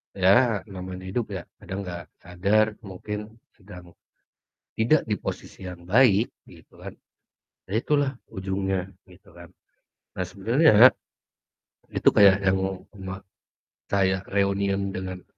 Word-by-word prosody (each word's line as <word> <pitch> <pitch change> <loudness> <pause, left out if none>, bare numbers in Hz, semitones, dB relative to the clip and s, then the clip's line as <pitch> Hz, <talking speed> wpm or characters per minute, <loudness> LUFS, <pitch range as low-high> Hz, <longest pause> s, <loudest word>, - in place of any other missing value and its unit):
ya, 100 +3 +3
namanya 95 -1 -8
hidup 105 +2 -3
ya, 90 - -5 0.2
kadang 95 +1 -5
nggak 85 -1 -6 0.2
sadar 100 +5 +2 0.2
mungkin 105 +2 -6 0.4
sedang 90 -4 -14 0.8
tidak 120 +8 +3
di 105 - 0
posisi 95 - -7
yang 90 -1 -9
baik 110 +3 +4 0.2
gitu - - -18
kan. - - -9 0.7
Ya - - -14
itulah 145 0 +1 0.2
ujungnya, 95 0 -3 0.2
gitu 95 +2 -19
kan. 85 0 -13 0.7
Nah 90 - -3
sebenarnya, 115 - +3 1.2
itu - - +2
kayak 100 -1 +6
yang 95 0 +3 0.4
oma 95 -1 -7 0.7
saya 95 -1 +2
reunian 100 0 0
dengan, 95 -1 -6
95 Hz, 115 wpm, -25 LUFS, 95-105 Hz, 1.2 s, kayak